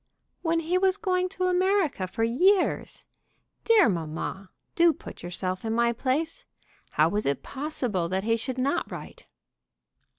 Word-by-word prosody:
"When 330 -1 +1
he 350 +3 +1
was 380 0 +3
going 370 -3 0
to 370 -1 -4
America 365 - +1
for 205 +5 -2
years! 360 - +2 0.6
Dear 450 -4 +6
mamma, 175 +1 -3 0.2
do 335 -1 +5
put - - -11
yourself 185 +1 -4
in 225 0 -1
my 235 +1 +2
place. 310 - -2 0.4
How - - +3
was 210 +1 -1
it 140 -1 -1
possible 250 - -2
that 190 +1 -1
he 225 +1 +2
should 255 +3 -4
not 280 +6 0
write?" - - -9
270 Hz, 145 wpm, -27 LUFS, -, 0.6 s, Dear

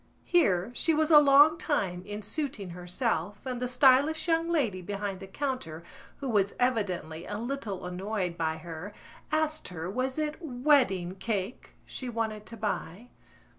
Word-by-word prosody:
Here 205 - +3
she 320 +6 +1
was 315 +1 +2
a 300 - +10
long 290 +3 +6
time 195 - -1
in 210 +1 -5
suiting 215 - -3
herself 180 +2 -2
and 250 -2 -3
the 250 - 0
stylish 275 +6 +4
young 330 0 +2
lady 240 - 0
behind 200 0 -4
the 195 - -9
counter, 190 - -4 0.3
who 275 - -5
was 200 -5 +1
evidently 185 -10 -1
a 205 - -4
little 230 -6 -4
annoyed 185 0 -3
by 160 -1 -1
her, 165 +5 -8 0.4
asked 310 0 0
her 175 0 -5
was 255 +4 -2
it 305 -1 -1
wedding 245 - +2
cake 205 +2 -4
she 255 - -6
wanted 220 -2 -3
to 230 - -8
buy. 210 +1 -4
220 Hz, 155 wpm, -29 LUFS, 185-275 Hz, 0.4 s, a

